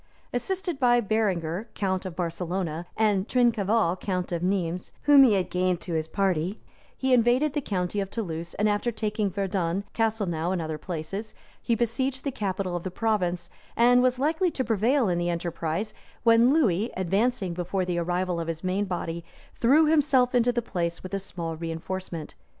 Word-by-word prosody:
] - - -36
Assisted 350 +5 -2
by 240 -2 +4
Berenger, 200 -3 -1
count 190 -2 -1
of 175 - -8
Barcelona, 175 -1 -3
and 210 -2 +2
Trincaval, 225 -6 +2
count 185 -2 -2
of 170 -1 -1
Nismes, 180 -1 -1
whom 290 -1 +7
he 240 -5 +5
had 190 -2 0
gained 180 -1 +1
to 175 - -5
his 160 -1 -1
party, 185 +1 0 0.4
he 260 -1 +1
invaded 250 +5 +3
the 295 - -1
county 190 -4 -2
of 195 -1 -2
Toulouse; 170 -6 -4
and 210 - +1
after 210 +3 +1
taking 210 -2 -1
Verdun, 190 -1 -1
Castlenau, 200 -7 0
and 190 - 0
other 155 -1 -4
places, 185 +6 -5 0.3
he 235 - +1
besieged 255 +3 -1
the 280 - -1
capital 195 -6 -2
of 175 - -2
the 185 - -4
province, 180 -4 -1 0.3
and 245 +1 +6
was 255 0 +2
likely 320 +7 +1
to 270 -5 -2
prevail 235 +3 +2
in 175 -2 +1
the 175 0 0
enterprise; 170 +3 -2 0.3
when 230 +1 +6
Lewis, 230 - +2
advancing 195 +1 0
before 180 +2 -2
the 175 -1 -1
arrival 175 0 -1
of 165 - -3
his 165 -1 -4
main 190 +3 0
body, 170 -2 -4 0.3
threw 280 +7 +4
himself 280 -5 +3
into 245 0 +3
the 240 -1 -1
place 170 -5 -3
with 185 +1 -8
a 195 - 0
small 170 -4 -5
reenforcement. 165 0 -5
195 Hz, 180 wpm, -26 LUFS, 175-235 Hz, 0.4 s, whom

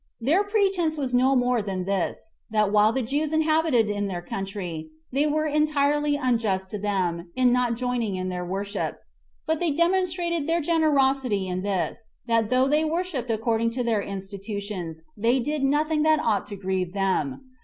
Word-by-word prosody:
Their 305 - +2
pretense 390 -6 +1
was 265 -4 -2
no 260 +2 +4
more 245 -2 +2
than 190 -3 -3
this, 195 - -2 0.2
that 215 -2 +2
while 210 +1 +5
the 265 +1 -1
Jews 290 +6 -1
inhabited 315 -6 +3
in 205 -1 -1
their 175 -2 -4
country, 180 -5 -5 0.2
they 280 +3 +2
were 310 +1 +1
entirely 295 -1 +2
unjust 225 -8 0
to 210 - -4
them 180 -4 -1
[in 255 -1 +4
not 245 -2 +1
joining 240 -4 -1
in 185 0 -3
their 180 -1 -3
worship] 195 +3 -3 0.5
but 320 -1 0
they 350 - +1
demonstrated 340 0 +1
their 335 +1 +2
generosity 275 - +2
in 180 0 -2
this, 195 +2 -2 0.2
that 230 -2 +1
though 255 +1 +3
they 300 +3 +2
worshipped 320 -5 -2
according 225 +1 +1
to 250 - +1
their 225 -3 +1
institutions, 195 -3 -6
they 235 +5 +2
did 295 +4 -2
nothing 300 +3 +2
that 310 0 +4
ought 220 -7 0
to 205 - -6
grieve 190 -2 -2
them. 195 - -1
245 Hz, 170 wpm, -25 LUFS, 200-300 Hz, 0.5 s, while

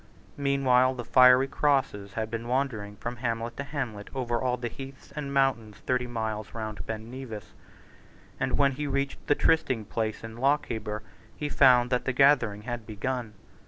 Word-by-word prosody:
Meanwhile 130 -2 +3
the 120 -2 -6
fiery 125 +2 +6
crosses 135 -9 0
had 110 0 -3
been 115 0 -4
wandering 120 -6 -1
from 120 +3 -5
hamlet 115 0 -2
to 140 - -3
hamlet 125 -8 -5
over 120 -3 -1
all 125 -1 0
the 120 0 -3
heaths 135 +3 -10
and 145 -2 -4
mountains 130 -6 +1
thirty 125 -1 0
miles 110 -3 -4
round 110 -2 -5
Ben 110 +1 -5
Nevis; 125 -5 -8 0.9
and - - 0
when 140 -1 +4
he 145 +2 -4
reached 140 0 -2
the 145 - +4
trysting 130 -9 +2
place 110 +1 -3
in 115 0 -8
Lochaber 115 -6 0 0.3
he 150 - -3
found 125 -3 +5
that 125 - +1
the 130 - 0
gathering 125 -6 +4
had 120 -2 -5
begun. 115 0 -3
125 Hz, 165 wpm, -28 LUFS, 110-135 Hz, 0.9 s, fiery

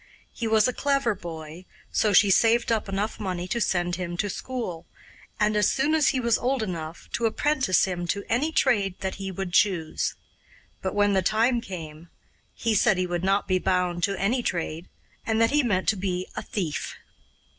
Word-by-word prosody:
He 230 - -3
was 220 0 +4
a 255 - -1
clever 275 -5 +1
boy, 165 -1 -9 0.3
so 215 - +2
she 200 +1 +6
saved 230 +4 +3
up 220 -3 0
enough 200 +3 -2
money 180 -3 -3
to 235 +5 -2
send 175 -3 0
him 175 -1 -4
to 205 +1 -1
school, 190 -11 -5 0.5
and, 210 0 +2
as 210 -1 +3
soon 275 +3 +1
as 310 -3 +3
he 260 - +2
was 235 -2 +2
old 255 -1 0
enough, 165 -4 -6
to 235 - +1
apprentice 260 - +2
him 175 -2 -3
to 200 +3 -1
any 275 +8 +1
trade 195 - +1
that 190 -1 -3
he 190 0 -4
would 190 -1 -5
choose. 175 -5 +1 0.7
But 190 - -3
when 205 0 +3
the 190 - +3
time 230 +5 +2
came, 165 -5 -8 0.5
he 230 -1 0
said 210 -1 +3
he 185 - +1
would 175 -1 -3
not 195 +1 +1
be 185 -1 +2
bound 180 -1 0
to 200 -1 -3
any 235 +6 +1
trade, 170 -4 -3 0.3
and 220 0 0
that 230 0 +4
he 295 +1 +4
meant 195 -8 0
to 215 - +2
be 185 -1 -2
a - - -3
thief. 175 -8 -4
195 Hz, 195 wpm, -26 LUFS, 180-230 Hz, 0.7 s, she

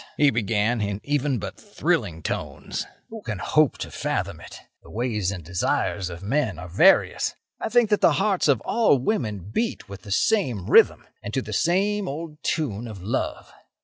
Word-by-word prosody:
he 145 -2 +5
began, 110 0 +1
in 100 -1 -2
even 145 -2 0
but 100 - -6
thrilling 80 -1 -1
tones—"who 225 -1 -5
can 105 - -4
hope 115 - +2
to - - -6
fathom - - -2
it? - - -11 0.2
The - - -16
ways 110 -4 -1
and 95 -4 -5
desires 90 +2 -1
of 85 +1 -8
men 120 - 0
are 90 - -7
various. 90 +3 +4 0.2
I - - -3
think 235 -2 +3
that 210 - +3
the - - +5
hearts 195 -6 +1
of 140 -6 +3
all 230 -11 +3
women 105 - -2
beat 230 0 -1
with 100 0 -9
the - - -12
same 125 - +1
rhythm, - - +6 0.2
and 100 - -6
to 135 - +1
the 105 - -6
same 195 - +1
old 150 +1 -6
tune 120 - -2
of 100 -5 -9
love. 105 - -3
120 Hz, 180 wpm, -24 LUFS, 100-155 Hz, 0.2 s, rhythm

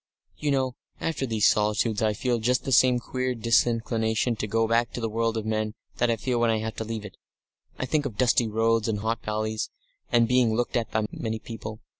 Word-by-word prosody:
"You 150 - -2
know, 130 -2 +1 0.3
after 160 -5 -2
these 110 -3 +3
solitudes, 105 +1 +1
I 110 -1 +2
feel 120 +2 0
just 125 +3 +1
the 135 - -3
same 125 0 +5
queer 130 +1 -2
disinclination 115 0 +1
to 105 - -2
go 115 +2 +1
back 115 +1 +2
to - - -4
the 115 - -1
world 115 0 0
of 110 - -3
men 110 -1 -1 0.2
that 120 - +2
I 115 - +3
feel 120 +2 -1
when 120 0 +3
I 110 - +2
have 110 0 -3
to - - -2
leave 110 -1 -5
it. 105 - -10 0.6
I - - -2
think 145 +1 0
of 105 - -9
dusty 120 -2 +3
roads 115 +1 +1
and 105 -2 -1
hot 115 +1 -1
valleys, 110 0 -2 0.4
and 120 -1 +4
being 125 -2 +3
looked 120 +1 -1
at 120 -2 0
by 110 -1 0
many 110 -1 -3
people. 110 -1 -8
115 Hz, 220 wpm, -26 LUFS, 110-120 Hz, 0.6 s, same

